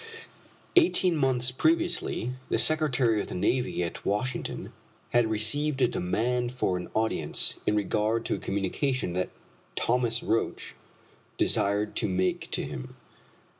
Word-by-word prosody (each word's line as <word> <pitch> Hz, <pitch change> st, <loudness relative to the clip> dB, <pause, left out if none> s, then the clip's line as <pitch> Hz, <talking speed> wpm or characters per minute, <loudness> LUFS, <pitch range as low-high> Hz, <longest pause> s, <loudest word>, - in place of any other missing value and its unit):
Eighteen 330 Hz, -, +4 dB
months 130 Hz, -3 st, +1 dB
previously 325 Hz, -, +1 dB, 0.2 s
the -, -, +2 dB
Secretary 135 Hz, -8 st, +3 dB
of -, -, -6 dB
the -, -, -6 dB
Navy 125 Hz, 0 st, 0 dB
at 85 Hz, -, -5 dB
Washington, 120 Hz, +6 st, -2 dB, 0.4 s
had 120 Hz, -2 st, +3 dB
received 130 Hz, +7 st, 0 dB
a 125 Hz, -, +5 dB
demand 120 Hz, +6 st, -1 dB
for 105 Hz, -7 st, 0 dB
an 90 Hz, 0 st, -5 dB
audience 110 Hz, 0 st, 0 dB
in 105 Hz, -, +3 dB
regard 105 Hz, +2 st, 0 dB
to -, -, 0 dB
a -, -, -2 dB
communication 100 Hz, +3 st, -1 dB
that 90 Hz, +1 st, -1 dB, 0.5 s
Thomas 120 Hz, -1 st, +1 dB
Roch 115 Hz, -, -1 dB, 0.6 s
desired 105 Hz, +1 st, +1 dB
to -, -, 0 dB
make 95 Hz, 0 st, 0 dB
to -, -, -1 dB
him. 60 Hz, -, -7 dB
115 Hz, 130 wpm, -28 LUFS, 105-130 Hz, 0.6 s, a